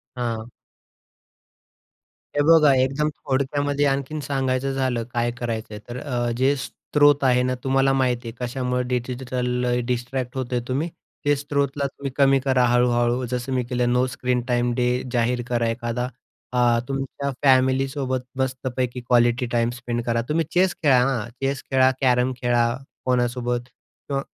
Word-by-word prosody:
हां. 115 Hz, -2 st, -3 dB, 1.9 s
हे 145 Hz, -, +3 dB
बघा 155 Hz, -4 st, +7 dB
एकदम 135 Hz, +4 st, +1 dB
थोडक्यामध्ये 145 Hz, +1 st, -1 dB
आणखीन 140 Hz, +2 st, -1 dB
सांगायचं 135 Hz, -1 st, -1 dB
झालं 130 Hz, -3 st, 0 dB
काय 120 Hz, 0 st, +1 dB
करायचं 115 Hz, -3 st, -4 dB
आहे. 105 Hz, -, -6 dB
तर 120 Hz, -1 st, -2 dB
जे 135 Hz, +2 st, +3 dB
स्रोत 145 Hz, +1 st, +2 dB
आहे 125 Hz, -1 st, +4 dB
ना, 130 Hz, 0 st, 0 dB
तुम्हाला 135 Hz, 0 st, +3 dB
माहीत 130 Hz, -2 st, +2 dB
आहे 115 Hz, -, -5 dB
कशामुळं 125 Hz, 0 st, -2 dB
डिजिटल 125 Hz, 0 st, -1 dB
डिस्ट्रॅक्ट 125 Hz, +1 st, -2 dB
होत 130 Hz, -, -1 dB
आहे. 120 Hz, -, +1 dB
तुम्ही 140 Hz, +6 st, -1 dB, 0.4 s
ते 145 Hz, 0 st, +4 dB
स्त्रोतला 140 Hz, 0 st, -1 dB
तुम्ही 140 Hz, 0 st, -6 dB
कमी 135 Hz, -1 st, +5 dB
करा 130 Hz, -1 st, +2 dB
हळू-हळू. 120 Hz, 0 st, +2 dB
जसं 125 Hz, +2 st, -3 dB
मी 130 Hz, -1 st, +1 dB
केलं 125 Hz, -1 st, +1 dB
नो 125 Hz, +1 st, +3 dB
स्क्रीन 125 Hz, 0 st, -1 dB
टाइम 120 Hz, 0 st, +1 dB
डे 125 Hz, 0 st, +1 dB, 0.3 s
जाहीर 120 Hz, 0 st, +1 dB
करा 120 Hz, -1 st, 0 dB
एखादा. 120 Hz, +1 st, -2 dB, 0.5 s
अ, 120 Hz, -1 st, +3 dB
तुमच्या 135 Hz, +1 st, -3 dB
फॅमिलीसोबत 130 Hz, 0 st, +2 dB, 0.2 s
मस्तपैकी 130 Hz, -1 st, -2 dB
क्वालिटी 120 Hz, +1 st, +3 dB
टाइम 115 Hz, -1 st, +2 dB
स्पेंड 120 Hz, -1 st, -3 dB
करा. 115 Hz, -1 st, +1 dB
तुम्ही 160 Hz, +1 st, +1 dB
चेस 185 Hz, 0 st, +3 dB
खेळा, 130 Hz, -4 st, +5 dB
हां, 120 Hz, -5 st, -1 dB
चेस 135 Hz, 0 st, -1 dB
खेळा, 130 Hz, 0 st, +5 dB
कॅरम 125 Hz, -1 st, +3 dB
खेळा, 120 Hz, -1 st, +3 dB, 0.4 s
कोणासोबत 125 Hz, -1 st, 0 dB
किंवा 135 Hz, +2 st, -7 dB
125 Hz, 145 wpm, -23 LUFS, 120-135 Hz, 1.9 s, बघा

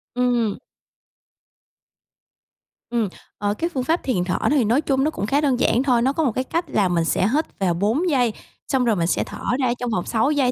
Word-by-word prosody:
Ừm. 245 Hz, -4 st, +1 dB, 2.3 s
Ừm. 235 Hz, -3 st, 0 dB, 0.3 s
Ờ, 205 Hz, 0 st, 0 dB
cái 335 Hz, +11 st, -2 dB
phương 265 Hz, -7 st, -3 dB
pháp 325 Hz, +7 st, 0 dB
thiền 215 Hz, -10 st, 0 dB
thở 180 Hz, 0 st, -1 dB
thì 285 Hz, -4 st, +3 dB
nói 235 Hz, +7 st, +2 dB
chung 270 Hz, -3 st, +1 dB
nó 305 Hz, -, +1 dB
cũng 205 Hz, -, -3 dB
khá 275 Hz, +7 st, +1 dB
đơn 270 Hz, -5 st, +1 dB
giản 245 Hz, -, +2 dB
thôi. 250 Hz, -4 st, +3 dB
Nó 265 Hz, +3 st, +2 dB
có 320 Hz, -, 0 dB
một 265 Hz, -, +2 dB
cái 255 Hz, -, -2 dB
cách 335 Hz, +6 st, -2 dB
là 200 Hz, -3 st, +2 dB
mình 170 Hz, -2 st, +1 dB
sẽ 185 Hz, -, +1 dB
hít 310 Hz, +2 st, +2 dB
vào 185 Hz, -3 st, +1 dB
4 220 Hz, -, 0 dB
giây, 250 Hz, -7 st, +2 dB, 0.3 s
xong 260 Hz, -3 st, +1 dB
rồi 225 Hz, -3 st, +2 dB
mình 170 Hz, -3 st, 0 dB
sẽ -, -, +1 dB
thở -, -, -9 dB, 0.2 s
ra 255 Hz, -3 st, +2 dB
trong 245 Hz, -, -2 dB
vòng 180 Hz, -6 st, -1 dB
6 225 Hz, +5 st, +1 dB
giây 275 Hz, -4 st, +2 dB
245 Hz, 225 wpm, -22 LUFS, 210-275 Hz, 2.3 s, thì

